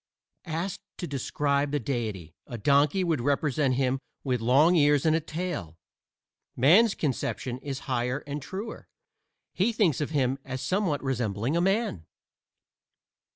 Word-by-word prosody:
Asked 175 +5 -3 0.2
to 180 - -4
describe 140 0 0
the 145 +1 0
Deity, 110 - -4
a 120 - -6
donkey 145 - +3
would 160 -7 0
represent 140 0 +1
him 130 0 +1 0.2
with 125 -4 -1
long 140 +9 +5
ears 145 -2 +4
and 160 0 +4
a - - +2
tail. 155 - -5 0.8
Man's 195 - +5
conception 130 -3 -2
is 135 -1 -5
higher 125 +1 -1
and 145 0 -5
truer: 195 +10 -7 0.7
he 200 +6 +2
thinks 195 - +2
of 150 - -1
him 135 -3 0
as 130 0 -5
somewhat 180 -3 0
resembling 120 0 -1
a 170 - +2
man. 195 - 0
145 Hz, 140 wpm, -27 LUFS, 130-165 Hz, 0.8 s, long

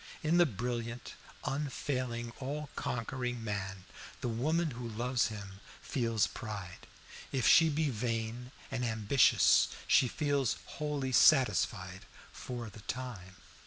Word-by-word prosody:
In 160 +2 +3
the 175 - +6
brilliant, 120 +1 -4 0.3
unfailing, 130 -4 -2
all 145 +2 -4
conquering 120 0 -3
man, 95 -3 -4 0.4
the - - -1
woman 155 +8 0
who 120 -1 -6
loves 120 +3 0
him 100 -3 -8 0.2
feels 115 -4 0
pride; 100 -5 -7 0.4
if 130 -3 +1
she 165 -1 +7
be 150 -1 0
vain 115 +1 -3 0.2
and 125 -2 -2
ambitious, 110 +2 +4 0.2
she 130 - +5
feels 140 -1 0
wholly 145 -3 -3
satisfied, 125 -4 +3 0.3
for 120 -2 -6
the 105 - -12
time. 100 -5 -6
120 Hz, 120 wpm, -32 LUFS, 110-135 Hz, 0.4 s, she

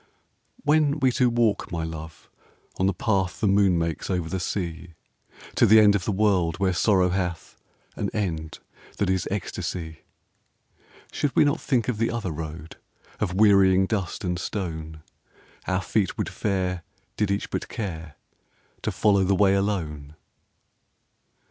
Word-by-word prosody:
_) - - -34 0.6
When 150 0 +3
we 130 -2 +3
two 125 0 +2
walk, 115 -3 +1
my 85 -2 -2
love, 80 -1 -8 0.5
on 95 - +3
the - - +3
path 95 -2 -1
The 110 - +1
moon 100 -2 +4
makes 85 -1 -2
over 90 -4 -1
the 95 - -2
sea, 85 -2 -4 0.6
To - - +4
the 110 +2 +8
end 105 -1 +6
of 100 -3 -1
the - - 0
world 95 -5 +2
where 95 -1 +1
sorrow 95 -1 +3
hath 90 -2 -3 0.4
An - - -2
end 80 -7 -3 0.4
that 100 -2 +1
is 95 -1 0
ecstasy, 85 -4 -4 1.1
Should 145 - -2
we - - +6
not 145 +3 0
think 125 -4 0
of 120 -4 -2
the 115 - +1
other 115 -6 -3
road 80 0 -7 0.4
Of 90 -4 -1
wearying 95 -2 +5
dust 95 -4 -3
and 90 -2 -1
stone 80 -6 -5 0.6
Our 95 0 0
feet 100 -5 0
would - - -2
fare 90 -3 -2 0.3
did 105 -2 0
each 100 +1 -2
but - - -3
care 85 - -5 0.7
To - - -2
follow 100 -2 +3
the 95 +1 +2
way 95 0 +4
alone? 80 -8 -2
95 Hz, 155 wpm, -25 LUFS, 85-105 Hz, 1.1 s, the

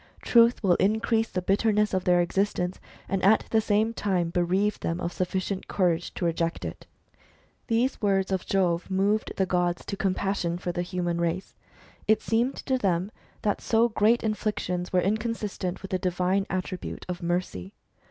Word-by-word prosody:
Truth 235 0 +4
will 185 -3 +4
increase 220 +3 +1
the 180 - -3
bitter 205 +4 +2
ness 210 0 +1
of 185 -1 0
their 180 -1 +4
existence, 180 0 -1 0.3
and 195 -1 -1
at 210 +3 +5
the 220 - +4
same 215 +1 +1
time 180 -6 0
bereave 185 +4 +1
them 165 +1 -2
of 175 -1 -3
sufficient 185 +1 -2
courage 175 -3 0
to 175 - -2
reject 165 0 -1
it." - - -7 0.8
These 240 +3 +1
words 195 -2 +1
of 190 -2 -1
Jove 180 -3 +1
moved 200 +3 +1
the 190 - +2
gods 175 -1 0
to - - -4
compassion 190 -3 -1
for 175 0 -3
the 175 - -2
human 175 -1 -2
race. 170 +2 -2 0.5
It 220 0 +4
seemed 235 +4 +1
to 260 -1 +1
them 190 -1 0 0.3
that 205 - 0
so 230 +1 +3
great 220 +2 +3
inflictions 210 -5 -2
were 180 - +3
inconsistent 210 -3 -2
with 195 - -7
the 185 - 0
divine 185 +2 0
attribute 185 -1 -4
of 180 -1 -4
mercy. 170 - -3
190 Hz, 170 wpm, -27 LUFS, 180-210 Hz, 0.8 s, at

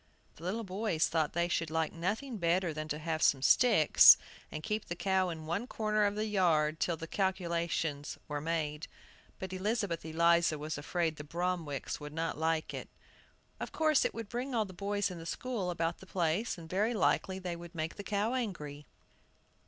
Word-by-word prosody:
The 160 - -13
little 210 +6 -2
boys 190 -4 0
thought 160 -2 0
they 170 0 +1
should 165 -2 -1
like 160 0 -1
nothing 215 +9 -2
better 170 0 +1
than 155 0 -4
to 150 - -2
have 160 0 -2
some 135 -3 +4
sticks, 210 - +7 0.3
and 155 - -6
keep 215 -1 -2
the 175 - -4
cow 190 0 +1
in 160 -2 -6
one 175 +9 -2
corner 215 -3 +1
of 205 0 0
the 215 +1 -1
yard 160 -7 +2
till 170 -2 0
the 165 - -6
calculations 170 -5 -1
were 150 -1 -3
made. 155 -1 -2 0.5
But 190 0 -6
Elizabeth 200 -2 -1
Eliza 170 0 +3
was 150 +1 -4
afraid 160 +1 -1
the 145 - -6
Bromwicks 170 -2 -3
would 150 0 -8
not 165 +1 -2
like 160 0 0
it. - - -6 0.7
"Of - - -5
course, 310 -2 +3
it - - -1
would 230 -2 -5
bring 245 +3 -3
all 220 -2 +2
the 190 - -10
boys 200 +1 -1
in 175 - -7
the 165 - -9
school 230 -6 -3
about 170 -1 -1
the 190 - -13
place, 180 +5 0
and 165 -1 -10
very 210 +7 0
likely 190 -2 +1
they 180 -2 -4
would 170 +1 -11
make 160 0 -2
the 205 - -8
cow 210 +3 0
angry." 150 - -4
175 Hz, 190 wpm, -32 LUFS, 160-200 Hz, 0.7 s, sticks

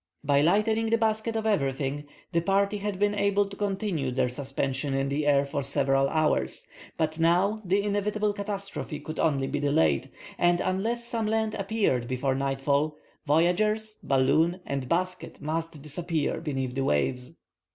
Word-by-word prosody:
By 140 -1 +3
lightening 220 +7 +2
the 230 - +3
basket 220 0 0
of 220 0 -1
everything 145 -6 0 0.2
the 170 - +2
party 200 +3 +1
had 205 -1 -3
been 205 +1 +2
able 200 0 +2
to 200 - -9
continue 195 -8 -1
their 125 0 +1
suspension 135 +1 -2
in 135 0 0
the 145 +1 -1
air 140 -1 +4
for 140 0 -3
several 135 0 +3
hours, 155 -1 0 0.3
but 160 0 -1
now 180 +6 +3
the 195 +2 +1
inevitable 210 +1 0
catastrophe 200 -6 -5
could 155 +1 -7
only 140 -4 +2
be 145 +2 -2
delayed, 80 - +2 0.3
and 175 0 +3
unless 225 +6 -1
some 230 -2 -2
land 220 0 0
appeared 195 - 0
before 130 +2 0
nightfall, 140 +3 0 0.3
voyagers, 210 +8 +2
balloon, 155 +7 +2
and 135 -2 -3
basket 185 +1 -2
must 160 +1 -3
disappear 160 +1 -2
beneath 135 -5 -3
the 135 +1 -1
waves. 125 - 0
165 Hz, 155 wpm, -27 LUFS, 140-205 Hz, 0.3 s, air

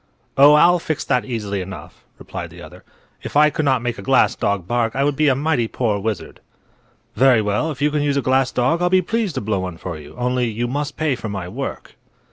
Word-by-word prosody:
"Oh, 145 +2 +7
I'll 175 +4 +5
fix 155 -2 -3
that 125 - 0
easily 105 -6 -3
enough," 95 +1 -10
replied - - -7
the - - -13
other. - - -12 0.4
"If - - -3
I 150 0 +6
could 150 +2 -2
not 130 -4 +2
make 120 -3 -3
a - - -6
glass 100 - +3
dog 100 -4 -2
bark 120 -2 0
I 135 - +1
would 145 0 +1
be 155 +2 +2
a 135 - +4
mighty 140 -4 0
poor 110 -3 -1
wizard." 105 -2 -4 0.8
"Very 130 -3 +5
well; 105 +9 0
if 145 -2 -4
you 150 - +2
can 150 0 0
use 145 -1 0
a - - +2
glass 130 0 +2
dog 130 +8 +1
I'll 180 - +2
be 185 0 +3
pleased 225 -3 -2
to - - -2
blow 105 -2 -1
one 90 -2 -5
for 85 -3 -6
you. 75 -1 -13
Only, 125 0 0
you 115 +2 -2
must 145 +3 -3
pay 155 -2 +1
for 115 -3 -5
my 100 -3 -5
work." 90 - -6
125 Hz, 240 wpm, -20 LUFS, 105-150 Hz, 0.8 s, Oh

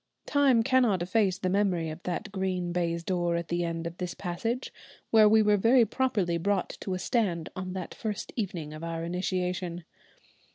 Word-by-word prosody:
Time 275 -5 +4
cannot 240 -8 +3
efface 190 0 +1
the 185 - -2
memory 185 -4 +1
of 155 +2 -9
that 180 +4 -4
green 185 -2 -2
baize 170 -1 -1
door 175 -1 0
at 170 -1 -3
the 175 0 0
end 165 -1 -3
of 170 +1 -6
this 180 -1 -4
passage, 225 +8 -3 0.4
where 215 -2 +7
we 220 0 +5
were 210 0 +4
very 230 +4 +5
properly 205 -8 0
brought 195 +1 0
to 190 - -3
a - - -2
stand 180 -5 0
on 185 0 -4
that 185 -3 -5
first 210 -2 -5
evening 175 -9 -3
of 155 +1 -8
our 165 0 -3
initiation. 180 0 -2
185 Hz, 180 wpm, -28 LUFS, 170-210 Hz, 0.4 s, where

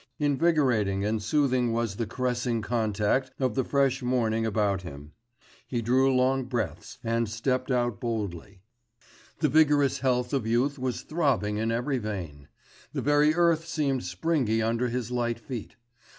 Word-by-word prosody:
Invigorating 135 - +2
and 110 +1 0
soothing 125 0 +1
was 115 -4 -1
the 115 - -2
caressing 120 -1 -1
contact 110 +3 0
of 130 -4 +1
the 130 - 0
fresh 135 0 +1
morning 115 -3 0
about 100 -3 0
him. 75 -4 -10 0.6
He 120 -2 -2
drew 130 +4 +3
long 130 0 +2
breaths, 120 -7 -4
and 115 -1 0
stepped 130 +4 -1
out 120 -5 0
boldly; 100 -5 -4 0.8
the - - +4
vigorous 145 -3 +3
health 125 -1 0
of 130 -5 0
youth 130 +5 +1
was 125 -1 -3
throbbing 135 - 0
in 110 +1 0
every 125 +3 -1
vein; 85 -10 -6 0.5
the - - -2
very 145 +1 +4
earth 170 -1 +2
seemed 140 - -1
springy 110 - 0
under 115 +2 0
his 120 -1 -3
light 120 -1 -1
feet. 115 -1 -7
120 Hz, 150 wpm, -27 LUFS, 110-135 Hz, 0.8 s, the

